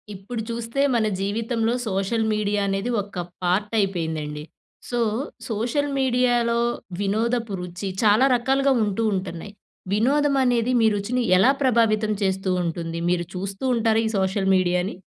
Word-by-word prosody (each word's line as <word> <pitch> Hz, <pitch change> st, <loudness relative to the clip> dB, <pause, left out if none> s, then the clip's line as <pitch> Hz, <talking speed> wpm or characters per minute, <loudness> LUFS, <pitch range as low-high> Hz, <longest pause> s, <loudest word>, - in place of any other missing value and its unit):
ఇప్పుడు 220 Hz, +5 st, -6 dB
చూస్తే 235 Hz, +3 st, -2 dB
మన 225 Hz, -2 st, +2 dB, 0.2 s
జీవితంలో, 225 Hz, +3 st, -1 dB
సోషల్ 195 Hz, +3 st, 0 dB
మీడియా 210 Hz, -1 st, 0 dB
అనేది 195 Hz, +4 st, -1 dB
ఒక 195 Hz, -2 st, -8 dB, 0.2 s
పార్ట్ 195 Hz, +5 st, 0 dB
అయిపోయిందండి. 160 Hz, -6 st, -2 dB, 0.5 s
సో, 240 Hz, -, -1 dB, 0.5 s
సోషల్ 240 Hz, +7 st, -1 dB
మీడియాలో 245 Hz, -2 st, +2 dB, 0.4 s
వినోదపు 225 Hz, +2 st, 0 dB
రుచి 180 Hz, +2 st, -5 dB
చాలా 215 Hz, +4 st, +5 dB
రకాలుగా 270 Hz, +3 st, +2 dB
ఉంటూ 210 Hz, +2 st, -1 dB
ఉంటున్నాయి. 190 Hz, +1 st, -5 dB, 0.4 s
వినోదం 280 Hz, +7 st, +2 dB
అనేది 245 Hz, -1 st, +1 dB
మీ 225 Hz, -, +4 dB
రుచిని 225 Hz, +5 st, -1 dB, 0.2 s
ఎలా 230 Hz, +9 st, +5 dB
ప్రభావితం 225 Hz, -4 st, +2 dB
చేస్తూ 190 Hz, 0 st, 0 dB
ఉంటుంది? 165 Hz, 0 st, -4 dB
మీరు 175 Hz, -1 st, +1 dB
చూస్తూ 195 Hz, +4 st, -5 dB
ఉంటారా 225 Hz, -1 st, +2 dB
ఈ -, -, 0 dB
సోషల్ 190 Hz, 0 st, 0 dB
మీడియాని? 180 Hz, +1 st, +1 dB
215 Hz, 130 wpm, -23 LUFS, 190-235 Hz, 0.5 s, చాలా